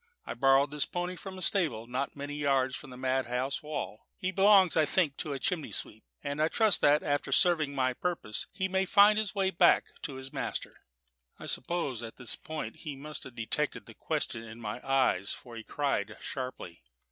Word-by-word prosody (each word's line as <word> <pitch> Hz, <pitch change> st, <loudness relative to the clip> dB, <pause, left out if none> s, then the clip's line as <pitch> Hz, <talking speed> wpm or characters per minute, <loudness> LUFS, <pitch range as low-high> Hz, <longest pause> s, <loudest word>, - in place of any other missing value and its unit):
I -, -, -4 dB
borrowed 135 Hz, +2 st, +4 dB
this 150 Hz, -1 st, 0 dB
pony 180 Hz, +1 st, -3 dB
from 190 Hz, +1 st, -8 dB
a 185 Hz, -, -5 dB
stable 155 Hz, -, +2 dB
not 130 Hz, +3 st, -3 dB
many 145 Hz, 0 st, -5 dB
yards 135 Hz, -3 st, +1 dB
from 150 Hz, -, -9 dB
the 125 Hz, -, -10 dB
madhouse 130 Hz, +1 st, -1 dB
wall; 150 Hz, -8 st, -5 dB
he 185 Hz, -, -2 dB
belongs, 195 Hz, -3 st, +6 dB
I 160 Hz, -, +5 dB
think, 155 Hz, -2 st, +2 dB
to 150 Hz, -, -3 dB
a -, -, -2 dB
chimney 160 Hz, +2 st, -1 dB
sweep, -, -, -4 dB, 0.2 s
and 145 Hz, +2 st, -2 dB
I 155 Hz, -, +4 dB
trust 215 Hz, +2 st, +3 dB
that, 150 Hz, +1 st, +5 dB
after 145 Hz, -1 st, -1 dB
serving 155 Hz, -2 st, +3 dB
my 130 Hz, -1 st, +1 dB
purpose, 165 Hz, -8 st, -3 dB
he 190 Hz, 0 st, -1 dB
may 190 Hz, 0 st, +1 dB
find 210 Hz, +2 st, +6 dB
a 215 Hz, -, +1 dB
way 190 Hz, -1 st, +2 dB
back 175 Hz, -, +4 dB
to 140 Hz, -, -5 dB
his 130 Hz, 0 st, -7 dB
master." -, -, -3 dB, 0.7 s
I -, -, -9 dB
suppose 140 Hz, -4 st, -2 dB
at 115 Hz, -1 st, -7 dB
this 125 Hz, -3 st, -4 dB
point 155 Hz, -9 st, -6 dB
he 150 Hz, -3 st, -6 dB
must 150 Hz, +2 st, -6 dB
have 130 Hz, -2 st, -11 dB
detected 115 Hz, -2 st, -2 dB
the -, -, -12 dB
question 115 Hz, -, -2 dB
in 115 Hz, 0 st, -10 dB
my 110 Hz, +2 st, -5 dB
eyes, 130 Hz, -8 st, +2 dB
for 120 Hz, -2 st, -10 dB
he 115 Hz, -, -7 dB
cried 110 Hz, -8 st, -1 dB
sharply. 125 Hz, -10 st, -6 dB
140 Hz, 200 wpm, -30 LUFS, 130-175 Hz, 0.7 s, belongs